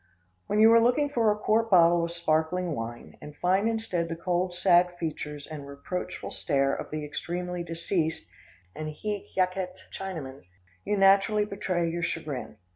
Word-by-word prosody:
When 210 - +1
you 220 +1 +8
are 230 - +7
looking 250 +5 +3
for 235 -6 +2
a 210 - -1
quart 225 +2 +1
bottle 170 -3 +5
of 170 - -2
sparkling 170 +1 0
wine 120 -2 -7
and 150 0 -10
find 190 +5 +2
instead 205 -7 -2
the 165 - -3
cold, 180 +2 -1
sad 175 -1 +4
features 150 -3 -5
and 150 -3 -8
reproachful 160 +6 -5
stare 135 -3 +1
of - - -5
the 155 -1 -4
extremely 175 +4 -4
deceased 165 -1 -2 0.5
and 155 0 -4
hic 205 +6 -4
jacet 185 0 0 0.2
Chinaman, 160 -9 -6 0.4
you 210 - 0
naturally 195 +2 +4
betray 185 -4 -1
your 170 +1 -2
chagrin. 155 -9 -4
175 Hz, 160 wpm, -28 LUFS, 155-195 Hz, 0.5 s, you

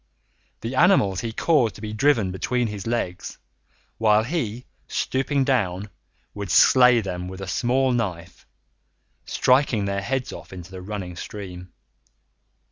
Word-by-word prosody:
The 115 +3 -4
animals 130 - +4
he 115 - -3
caused 125 -3 +2
to - - -12
be 105 -1 -5
driven 110 -5 +2
between 120 +6 -1
his 105 -1 -5
legs, 105 -6 -3 0.6
while 110 -1 +4
he, 125 -4 -3 0.2
stooping 135 +1 0
down, 105 -7 0 0.4
would 100 -2 -6
slay 125 +6 +6
them 90 -3 -5
with 95 0 -8
a 95 - -6
small 130 +6 +1
knife, 95 -8 -4 0.8
striking 125 -5 +2
their 100 0 -1
heads 130 +5 -2
off - - -10
into 90 0 -10
the 95 -1 -8
running 95 -2 -6
stream. 90 -1 -8
105 Hz, 135 wpm, -23 LUFS, 95-125 Hz, 0.8 s, slay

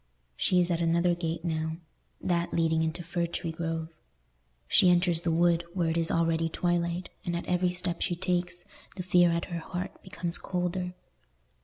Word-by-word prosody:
She 180 - +2
is 175 0 +2
at 170 0 0
another 170 +1 +3
gate 165 -1 -3
now—that 165 +2 -3
leading 160 -1 +2
into 160 +2 -2
Fir 170 +1 -1
tree 170 0 -3
Grove. 165 0 -3 0.8
She 180 - +6
enters 175 -1 +4
the 170 - -1
wood, 170 +1 +3
where 170 -3 +1
it - - -2
is 165 -1 +2
already 165 0 +1
twilight, 175 +1 -1
and 175 -3 -2
at 170 - -3
every 180 0 +2
step 175 -1 -2
she 175 - 0
takes, 175 0 -2 0.3
the 185 - -4
fear 175 -1 +5
at 170 0 -1
her 170 - -1
heart 180 +2 -6
becomes 170 -2 -3
colder. 180 0 -2
170 Hz, 170 wpm, -29 LUFS, 165-180 Hz, 0.8 s, She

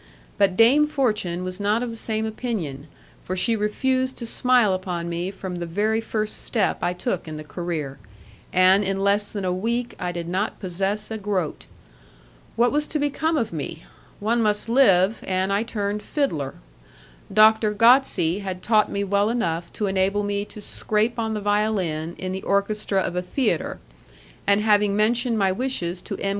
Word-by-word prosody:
But 195 -2 +3
Dame 270 +7 +6
Fortune 210 - -1
was 185 +1 -5
not 210 +4 +1
of 240 - -3
the - - -7
same 220 -1 -2
opinion, 200 - -4 0.4
for 185 - -3
she 225 +5 +2
refused 260 +5 0
to 235 - -5
smile 245 -3 +3
upon 180 -2 -3
me 170 +2 -3
from 190 -2 -6
the 170 0 -4
very 215 +6 0
first 215 -1 -1
step 220 -5 0
I 175 - +1
took 180 -1 -3
in 155 -1 -6
the 155 - -7
career, 155 -4 -5 0.5
and 185 +2 +5
in 195 0 -1
less 205 +1 +2
than 200 -3 -4
a 180 - 0
week 235 +6 -2
I 180 - -2
did 170 -1 -5
not 190 +5 -2
possess 195 +3 -2
a 220 - -3
groat. 190 -6 -3 0.9
What 235 +2 +3
was 300 +1 0
to 305 - -2
become 300 +2 0
of 225 -9 -1
me? 160 +1 -5 0.4
One 230 +3 +1
must 210 0 +1
live, 220 -5 +4
and 190 +1 0
I 200 - +2
turned 210 -2 -3
fiddler. 160 - -2 0.8
Doctor 215 +1 +5
Gozzi 210 -6 +4
had 185 -2 -5
taught 215 -1 +3
me 200 - -1
well 200 +1 +1
enough 170 -8 -2
to 210 - -2
enable 195 +1 +1
me 205 0 -2
to 210 - -11
scrape 220 +3 -1
on 220 -1 -1
the 210 - -3
violin 200 -6 0
in 185 0 -4
the 190 0 -4
orchestra 200 0 0
of 180 - -3
a 180 - 0
theatre, 245 +9 -1 0.7
and 200 +1 +4
having 210 -1 +3
mentioned 230 +2 +2
my 195 -2 +2
wishes 185 -6 -2
to - - -6
M. 195 - -2
205 Hz, 180 wpm, -23 LUFS, 185-225 Hz, 0.9 s, Dame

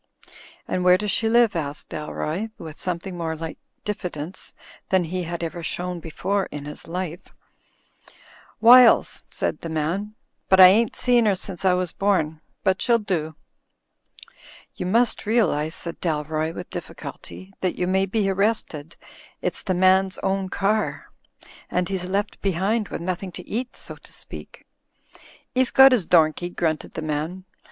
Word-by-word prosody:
"And 180 - -1
where 180 0 +6
does 210 +1 -1
she 225 - +1
live?" 235 -3 +4
asked 150 -3 -4
Dalroy, 155 +6 -4
with 160 -2 -9
something 180 +1 -3
more 165 -2 -3
like 160 0 -7 0.3
diffidence 180 -4 -5 0.3
than 190 -1 +3
he 180 +2 -3
had 170 0 -4
ever 170 +1 -4
shown 180 +2 -3
before 190 +5 -2
in 145 -1 -7
his 150 - -9
life. 175 0 -5 1.3
"Wiles," 240 +2 +7
said - - -3
the 165 - -5
man, 170 +7 -2 0.3
"but 190 - +5
I 185 -1 +11
ain't 225 +4 +3
seen 240 -3 +3
'er 200 - +3
since 185 0 -6
I 185 - +5
was 180 -2 -2
bom. 160 -6 0 0.2
But 190 -1 +1
she'll 235 -2 +4
do." 170 -8 -3 1.4
"You 180 - -4
must 230 +2 +2
realise," 165 -9 +1
said 170 -1 -6
Dalroy, 155 -1 -1
with 180 - -8
difficulty, 165 +3 -8
"that 185 - 0
you 180 - 0
may 190 +1 +1
be 205 0 0
arrested 190 -6 -1 0.2
— - - -23
it's - - -1
the 185 - -1
man's 185 +1 +3
own 190 0 0
car; 205 +3 -1 0.6
and 180 0 0
he's 190 -2 -2
left 200 +2 -2
behind 200 +4 0
with - - -6
nothing 185 +1 -3
to 180 - -9
eat, 245 +3 -4
so - - -10
to - - -14
speak." - - -10 0.5
" - - -21
'E's 255 -1 +2
got 265 0 +8
'is 210 -9 +1
domkey," 165 +1 +3
grunted 160 -3 -2
the 160 - -4
man. 155 +5 -3
185 Hz, 160 wpm, -23 LUFS, 165-200 Hz, 1.4 s, I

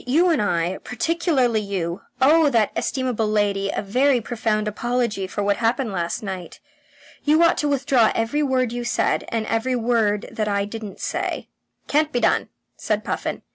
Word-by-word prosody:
"You 330 +8 +4
and 310 - +2
I, 175 -2 0
particularly 260 - +1
you, 185 -4 -3 0.2
owe 300 +3 +5
that 230 -5 +2
estimable 250 -5 -1
lady 205 -2 +1
a - - -2
very 255 +6 +2
profound 220 -2 -1
apology 235 -2 -1
for 205 +2 -3
what 200 0 +1
happened 235 +1 0
last 175 +1 -3
night. 190 -3 -6 0.6
You 310 +3 +4
ought 335 - +3
to 295 - +1
withdraw 265 -5 +3
every 230 +7 0
word 260 -4 +1
you 240 0 -3
said, 240 - 0
and 225 -1 -2
I - - -7
every 235 +3 0
word 225 -3 +1
that 220 -2 -2
I 200 -1 0
didn't 210 -1 -8
say." - - -3 0.4
"Can't 305 +1 +2
be 245 - 0
done," - - +1 0.3
said - - -1
Puffin. - - -3
230 Hz, 175 wpm, -22 LUFS, 205-260 Hz, 0.6 s, owe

